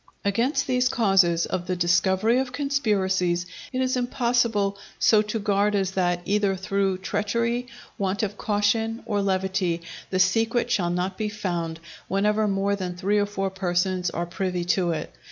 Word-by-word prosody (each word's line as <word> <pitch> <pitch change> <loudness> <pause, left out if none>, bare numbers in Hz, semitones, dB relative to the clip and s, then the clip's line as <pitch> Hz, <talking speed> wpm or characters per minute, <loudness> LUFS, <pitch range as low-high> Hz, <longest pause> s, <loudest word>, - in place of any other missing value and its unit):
Against 230 +8 +1
these 255 -1 +2
causes 190 -8 +3
of 180 -1 -3
the 185 - 0
discovery 190 +6 +2
of 260 -1 -2
conspiracies 195 -11 0 0.3
it 255 -1 -1
is 255 0 +1
impossible 235 -5 +1 0.2
so 215 -2 +5
to 215 +1 -3
guard 205 0 +1
as 190 -2 0
that 175 -2 0
either 205 -1 +1
through 195 0 0
treachery, 230 +5 -1 0.3
want 195 +1 -1
of 205 -1 -2
caution, 220 +2 0
or 205 -3 0
levity, 190 -3 0 0.3
the 185 - -1
secret 225 +4 +2
shall 175 -6 +1
not 180 +3 -2
be 215 -1 -1
found 175 -6 -3
out, 165 - -24 0.2
whenever 210 +3 +1
more 200 0 +1
than 180 -3 -4
three 200 +3 +1
or 205 - +1
four 195 -1 -2
persons 185 -1 0
are 170 0 -3
privy 180 +1 -2
to 180 0 +1
it. 160 -2 -3
195 Hz, 165 wpm, -25 LUFS, 185-220 Hz, 0.3 s, so